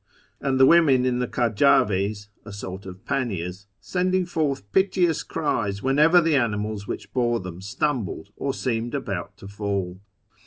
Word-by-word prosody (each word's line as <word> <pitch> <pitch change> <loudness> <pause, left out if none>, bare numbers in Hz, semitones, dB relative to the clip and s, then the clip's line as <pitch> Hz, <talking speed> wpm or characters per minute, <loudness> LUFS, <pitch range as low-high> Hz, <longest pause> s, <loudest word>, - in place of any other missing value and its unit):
and 135 -1 0
the 130 - +8
women 140 -5 +5
in 125 -1 +1
the 125 - -1
kajdvds 105 -4 +2 0.2
(sort 95 -1 -7
of 95 0 -11
panniers) 100 -8 -3
sending 185 - 0
forth 140 - -2
piteous 185 -4 +2
cries 105 -11 -2
whenever 150 +6 +5
the 165 -3 +2
animals 105 -4 -1
which - - -6
bore 120 -2 +1
them 90 -1 -8
stumbled 110 - -2
or 140 - -2
seemed 120 -1 -2
about 100 -10 -4
to 95 - -11
fall. 100 -2 -3
120 Hz, 145 wpm, -24 LUFS, 100-140 Hz, 0.2 s, the